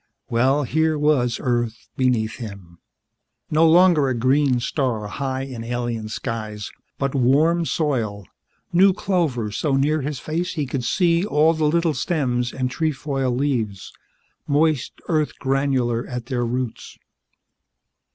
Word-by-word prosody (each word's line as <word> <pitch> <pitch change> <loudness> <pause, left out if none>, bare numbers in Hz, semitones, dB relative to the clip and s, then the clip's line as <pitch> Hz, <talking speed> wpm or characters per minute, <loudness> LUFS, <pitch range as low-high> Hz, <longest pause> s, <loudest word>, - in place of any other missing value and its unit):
Well, 130 +5 +2
here 160 +4 +1
was 145 -5 +2
Earth 120 -3 -2
beneath 120 -4 0
him. 100 -7 -9 0.7
No 160 +1 +5
longer 170 -4 +5
a 130 - 0
green 130 +1 +2
star 120 -4 -1
high 130 +4 -3
in 130 -4 -7
alien 120 -2 -3
skies, 110 -2 -5 0.3
but 135 -1 -1
warm 150 +6 +3
soil, 115 - -1 0.5
new 190 +2 +6
clover 155 - -1
so 140 +6 0
near 150 +3 +2
his 145 +1 -3
face 170 +4 -3
he 150 -3 -1
could 130 -1 -3
see 170 +6 +2
all 160 -4 +3
the 155 -1 0
little 165 +1 +2
stems 130 -8 -1
and 130 -1 -2
trefoil 140 -3 -1
leaves, 120 -7 -2 0.5
moist 150 -2 +1
earth 155 -3 0
granular 130 -3 0
at 125 -2 -5
their 120 -2 -1
roots. 125 -1 -4
135 Hz, 130 wpm, -22 LUFS, 120-155 Hz, 0.7 s, new